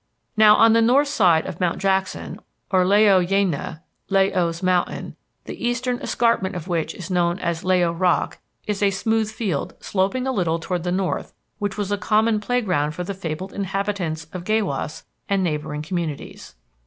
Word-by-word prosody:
"Now 215 -1 +7
on 225 0 +6
the 230 - +4
north 270 +5 +4
side 180 - +3
of 170 - -6
Mount 180 -2 0
Jackson, 190 -1 -1 0.3
or 185 -1 +4
La 195 +2 +3
o 200 -3 +5
Yaina 175 -4 -1 0.3
(La 195 -1 +4
o's 170 -2 -1
Mountain), 180 -1 0 0.3
the - - -8
eastern 245 +1 -1
escarpment 215 -5 +1
of 175 -1 -6
which 170 -3 -2
is 185 0 -7
known 175 -1 +1
as 170 -3 -3
La 185 0 +3
o 170 - +2
Rock, 175 +1 0 0.3
is 210 -1 -2
a 200 - +4
smooth 220 +2 0
field 210 -9 -3
sloping 200 +7 -1
a 265 - 0
little 170 -8 0
toward 175 +1 -3
the 175 +1 -2
north 185 0 -2 0.2
which 205 -1 -3
was 205 -1 -2
a 205 - 0
common 215 +2 +2
playground 190 -10 0
for 180 - -3
the 200 +3 -4
fabled 185 0 -5
inhabitants 195 -5 -2
of 180 -2 -5
Gaywas 195 -8 -1 0.3
and 195 -1 +2
neighboring 150 -2 -2
communities. 160 -3 -5
190 Hz, 180 wpm, -22 LUFS, 170-210 Hz, 0.3 s, Now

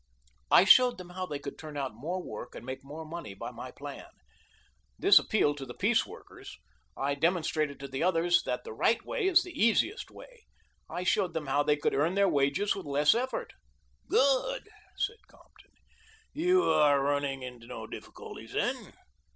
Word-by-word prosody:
"I - - +7
showed 250 +4 +7
them 180 -1 -10
how 185 0 -4
they 145 - -4
could 140 - -8
turn 155 -2 -8
out 135 -4 -3
more 170 +11 -4
work 110 +3 -8
and - - -9
make 130 +1 -6
more 150 +4 -8
money 155 -11 -7
by - - -6
my - - -8
plan. - - -9 0.9
This - - +7
appealed 145 0 +1
to 135 - -6
the 120 - -9
piece - - +2
workers. - - -12 0.4
I 140 +1 0
demonstrated 155 -3 0
to 140 - -6
the 135 0 -5
others 175 0 +3
that 125 0 -3
the - - -8
right 225 - +1
way - - -1
is 365 -1 +5
the 360 - -9
easiest 235 - +1
way - - -15 0.4
I 180 - -4
showed 185 -2 +1
them 160 -2 -2
how 140 +1 +1
they 150 0 +2
could 145 - 0
earn 160 +6 +1
their 200 0 +4
wages 145 +5 +1
with 195 -6 -7
less 145 +1 +4
effort." 245 0 -3 0.6
"Good," 280 - +2 0.3
said 455 +3 -3
Compton. - - -23 0.6
"You 360 +4 +3
are 145 - +4
running 140 -1 -1
into 125 -2 -9
no 115 -3 -7
difficulties - - -10
then? - - -2
155 Hz, 180 wpm, -29 LUFS, 140-200 Hz, 0.9 s, I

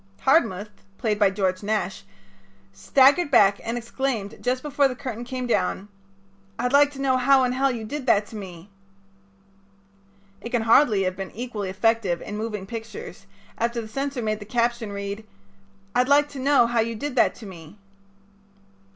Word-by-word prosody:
Hardmuth, 220 - +2 0.3
played 215 -4 -1
by 205 -2 +5
George 190 -2 -1
Nash, 205 -2 -2 0.7
staggered 275 - +4
back 205 -6 +4
and 230 +1 -3
exclaimed, 235 -3 -3
just 255 +1 -1
before 285 -1 +2
the 255 - -5
curtain 250 -3 -6
came 255 +1 -5
down: 205 -3 -1 0.7
"I'd 245 +2 -1
like 285 0 +6
to 270 - -10
know 260 -2 +2
how 265 +1 +4
in 250 - +1
Hell 270 +2 +1
you 235 -4 -4
did 270 +3 -6
that 205 -3 +4
to - - -11
me." 190 -2 -9 1.7
It 235 - -6
can 240 -2 0
hardly 225 -3 +4
have 185 0 -1
been 195 0 -6
equally 220 -4 -5
effective 200 -2 +1
in 205 - -6
moving 210 -2 -4
pictures 220 -3 -8 0.3
after 235 +1 -1
the 225 - -6
censor 270 +2 -3
made 215 -1 -1
the - - -8
caption 235 0 -1
read: 200 +1 -5 0.7
"I'd 250 +2 +2
like 290 +1 +4
to 280 - -8
know 275 -2 +4
how 235 0 0
you 225 +1 0
did 285 +4 -5
that - - +3
to 225 - -12
me." 175 -1 -12
230 Hz, 170 wpm, -24 LUFS, 205-260 Hz, 1.7 s, like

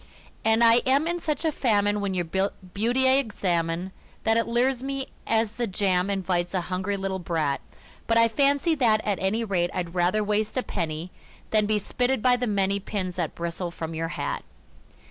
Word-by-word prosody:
And 225 +1 +4
I 230 0 +7
am 275 +4 +3
in 345 +1 -1
such 315 0 -2
a 320 - +3
famine 205 -6 +1
when 195 -2 -2
your 175 -1 0
beauty 200 +7 0
I 260 +1 +5
examine 180 -7 -1 0.3
That 225 0 +3
it 230 - +1
lures 245 +2 +1
me 275 0 -4 0.2
as 225 -1 +2
the 240 +1 -2
jam 190 -1 +1
invites 185 -2 -1
a 185 - +1
hungry 190 +2 -1
little 190 -1 -3
brat; 160 -5 -1 0.5
But 230 - +3
I 230 0 +6
fancy 280 +6 +2
that, 230 -7 +2
at 205 -2 0
any 205 +5 +1
rate, 180 -5 0
I'd 175 -2 -3
rather 185 +4 +2
waste 210 +3 -1
a 255 - +1
penny 165 -1 -4 0.4
Than 215 -1 +3
be 215 0 +2
spitted 245 +3 -1
by 250 -1 +5
the 245 0 -2
many 200 -1 +1
pins 185 -3 -4
that 170 -4 -2
bristle 170 +1 -3
from 165 -1 -6
your 165 +1 -2
hat. - - -3
205 Hz, 190 wpm, -26 LUFS, 180-235 Hz, 0.5 s, I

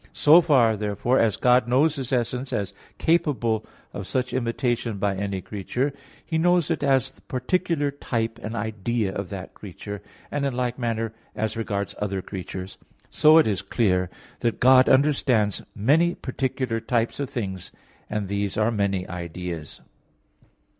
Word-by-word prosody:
So 160 +4 +7
far, 125 -9 +4
therefore, 105 +5 0
as 110 -3 +2
God 125 0 +4
knows 145 +6 +3
His 135 -4 -5
essence 125 +1 -1
as 100 -2 -2 0.2
capable 140 -10 +1 0.3
of 100 -2 -6
such 130 -1 -1
imitation 120 -2 -1
by 100 0 0
any 100 -1 -3
creature, 120 +9 -2 0.3
He 160 -2 -1
knows 175 -1 +3
it 165 - -1
as 135 -2 +2
the - - -24
particular 145 +1 -1
type 115 -5 -3
and 110 +2 -5
idea 110 -1 -2
of 100 -2 -4
that 95 -2 -7
creature; 100 +1 -8 0.3
and 145 -1 -1
in 135 -3 -1
like 125 0 -2
manner 115 -2 -1 0.2
as 110 0 -2
regards 100 -3 -2
other 100 -2 -2
creatures. 95 0 -7 0.3
So 155 +1 +6
it 160 - +6
is 100 -3 0
clear 95 -3 +1 0.3
that 115 -2 -1
God 130 +1 +6
understands 130 -7 +3
many 155 +11 +3
particular 130 -3 -2
types 115 +1 -1
of 140 -2 -2
things 95 -6 -4 0.4
and 105 -2 -2
these 100 0 -2
are 110 +2 +2
many 100 -4 0
ideas. 85 -2 -6
115 Hz, 155 wpm, -25 LUFS, 100-130 Hz, 0.4 s, So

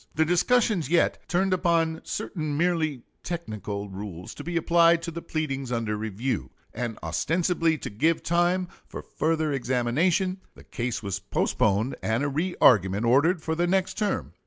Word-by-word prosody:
The 160 - +3
discussions 180 - +2
yet 170 +1 +2
turned 185 +2 +1
upon 165 -3 +1
certain 155 -4 -3
merely 155 -6 0 0.2
technical 105 - -5
rules 95 -3 -7
to - - -9
be 170 0 -2
applied 170 0 +4
to 170 - -4
the 170 +1 -6
pleadings 135 -6 -3
under 115 -3 -1
review; 110 +4 -3 0.2
and 120 -2 -4
ostensibly 165 - +1
to - - -6
give 155 +11 +1
time 175 +2 +1 0.2
for - - -8
further 160 -1 0
examination, 140 +9 +1 0.2
the - - -15
case 120 -1 -4
was 100 -1 -3
postponed 100 +4 0
and 110 +5 0
a 145 - 0
re 170 +6 -2
argument 100 -1 +4
ordered 155 +8 +3
for 160 - -1
the 175 +2 +1
next 185 +1 +1
term. 210 -2 -2
155 Hz, 160 wpm, -26 LUFS, 115-175 Hz, 0.2 s, applied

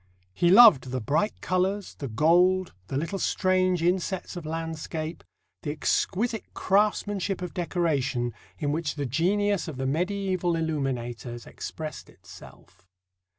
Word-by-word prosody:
He 175 - +2
loved 205 - +8
the 130 0 -2
bright 155 - -1
colours, 190 +2 -1
the 140 - -6
gold, 175 +9 +3
the 135 - -3
little 170 +7 -2
strange 185 -2 +1
insets 185 +2 -1
of 170 -3 -6
landscape, 160 0 -4 0.4
the 150 - -4
exquisite 210 +8 -1
craftsmanship 200 -1 +1
of 180 - -5
decoration, 145 - -1 0.2
in 145 -2 -1
which 155 0 -2
the 145 -2 -2
genius 190 - +1
of 155 -5 -6
the 130 - -2
medieval 180 +3 0
illuminators 125 -7 -3
expressed 155 -1 -7
itself. 95 - -16
170 Hz, 125 wpm, -27 LUFS, 145-185 Hz, 0.4 s, loved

